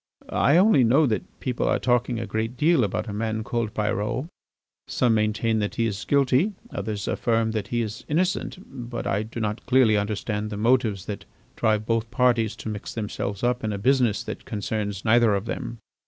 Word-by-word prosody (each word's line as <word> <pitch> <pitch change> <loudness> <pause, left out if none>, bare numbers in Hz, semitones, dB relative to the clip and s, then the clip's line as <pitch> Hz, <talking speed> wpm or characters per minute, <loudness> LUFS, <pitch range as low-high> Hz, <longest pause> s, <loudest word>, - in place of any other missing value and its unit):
I 140 +5 +4
only 185 - +5
know 135 +7 +4
that 110 -5 -3
people 125 -2 -1
are - - +3
talking 120 -1 +1
a 115 - -3
great 115 +3 -3
deal 155 -2 +4
about 105 +3 -2
a 105 - -4
man 110 +1 -2
called 115 -2 -2
Pyrot. 105 +4 -1 0.6
Some 120 -3 +2
maintain 110 +1 +1
that 105 -1 -2
he 115 - +1
is 100 -2 -3
guilty, 140 +8 +3 0.2
others 105 -2 -4
affirm 115 -1 +1
that 110 -2 -3
he 120 -1 0
is 110 -1 -6
innocent, 180 +5 0 0.3
but 120 - -4
I 100 - 0
do 110 +2 -6
not 105 0 -2
clearly 125 -4 +5
understand 105 +1 -2
the 105 - -5
motives 110 -4 +2
that 105 - -6 0.3
drive 110 -1 +1
both 115 0 0
parties 120 -3 +2
to - - -6
mix 105 -2 -6
themselves 105 -2 -4
up 125 0 +1
in 110 - -1
a 100 - -2
business 125 -1 +2
that - - -6
concerns 105 -1 -3
neither 115 -1 +5
of 100 +2 -2
them." 115 - -4
115 Hz, 190 wpm, -25 LUFS, 105-125 Hz, 0.6 s, only